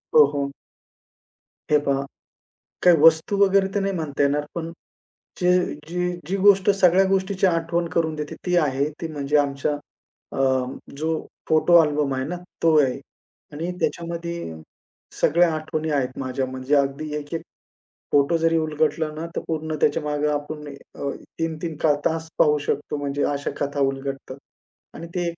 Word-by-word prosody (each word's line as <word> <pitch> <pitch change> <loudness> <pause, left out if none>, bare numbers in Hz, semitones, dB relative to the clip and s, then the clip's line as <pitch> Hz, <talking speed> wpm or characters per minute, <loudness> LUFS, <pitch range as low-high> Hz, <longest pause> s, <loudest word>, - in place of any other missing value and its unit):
हो, 150 -2 +9
हो. 140 -1 -2 1.2
हे 150 - +7
पहा. 140 -1 +1 0.8
काही 175 -2 +7
वस्तू 165 +5 +5
वगैरे 195 -1 +4
तर 205 - +1
नाही 195 0 0
म्हणता 150 -4 -2
येणार. 145 +1 +2
पण 165 -1 -4 0.7
जे 180 0 +3 0.4
जी 180 +1 -1 0.2
जी 195 +3 -1
गोष्ट 195 0 +5
सगळ्या 190 -1 +4
गोष्टीची 190 0 +1
आठवण 170 0 0
करून 160 -2 0
देते 150 -1 -5
ती 180 0 +2
आहे. 140 -4 +2 0.2
ती 165 - -3
म्हणजे 145 0 0
आमच्या 140 +1 0 0.6
अ, - - -5 0.6
जो 155 +2 -2 0.4
फोटो 160 +2 +4
अल्बम 150 -3 +1
आहे 130 0 -2
ना 175 +5 -4 0.3
तो 165 -2 +5
आहे. 135 0 0 0.5
आणि 165 +4 -3
त्याच्यामध्ये 170 - -3 0.7
सगळ्या 170 +1 +4
आठवणी 155 0 -3
आहेत 130 -3 -1
माझ्या 130 0 -2
म्हणजे 130 +2 -2
अगदी 140 +2 0
एक, 145 +1 -7
एक 165 - -3 0.7
फोटो 145 +4 +3
जरी 165 0 +2
उलगडलं 155 0 0
ना, 160 +2 -4
तर - - -1
पूर्ण 155 -1 -2
त्याच्यामागे 150 0 +1
आपण 150 0 -8 0.3
अ, 140 - -3 0.3
3-3 165 0 -3 0.3
तास 160 0 -1
पाहू 150 -1 +4
शकतो 145 +1 -1
म्हणजे 145 0 -2
अशा 140 0 -3
कथा 145 0 -1
उलगडतात. 135 0 -6 0.6
आणि 170 - -8
ते 175 -1 0
एक 170 - -9
155 Hz, 150 wpm, -23 LUFS, 145-170 Hz, 1.2 s, हो